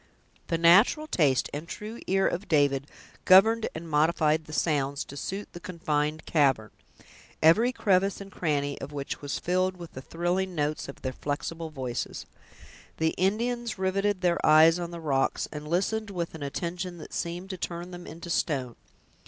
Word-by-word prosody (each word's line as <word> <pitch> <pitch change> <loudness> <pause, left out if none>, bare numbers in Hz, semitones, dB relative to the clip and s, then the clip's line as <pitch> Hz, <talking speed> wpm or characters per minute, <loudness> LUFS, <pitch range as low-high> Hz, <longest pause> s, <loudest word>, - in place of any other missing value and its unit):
The 165 - 0
natural 195 - +5
taste 145 - +2
and 150 +3 -5
true 215 +5 -7
ear 195 +1 +3
of 180 +4 -3
David 145 -2 +2 0.4
governed 220 +4 +6
and 165 +1 -6
modified 155 0 +2
the 155 - -11
sounds 145 -3 0
to 140 - -10
suit 195 +8 -5
the 175 - -8
confined 155 -3 -2
cavern, 135 -8 +2 0.7
every 215 +11 +5
crevice 195 -5 +1
and 195 0 -9
cranny 145 -5 -1
of 140 - -6
which 140 -1 -5
was 145 -1 -3
filled 185 +1 0
with 170 -2 -9
the 130 - -7
thrilling 175 +5 -2
notes 150 0 -1
of 140 - -10
their 130 -1 -2
flexible 160 +4 -4
voices. 130 -5 -4 0.7
The 160 0 +2
Indians 230 +6 -1
riveted 190 +1 0
their 175 -1 +1
eyes 160 +2 +6
on 170 -1 -4
the 170 0 -7
rocks, 140 -4 0
and 150 0 -7
listened 205 +6 0
with 175 -4 -4
an 160 - -9
attention 175 +5 -4
that 155 - -11
seemed 175 +3 -4
to 185 - -5
turn 175 0 -5
them 175 0 -9
into 170 +2 -8
stone. 130 -8 -1
170 Hz, 170 wpm, -27 LUFS, 150-185 Hz, 0.7 s, governed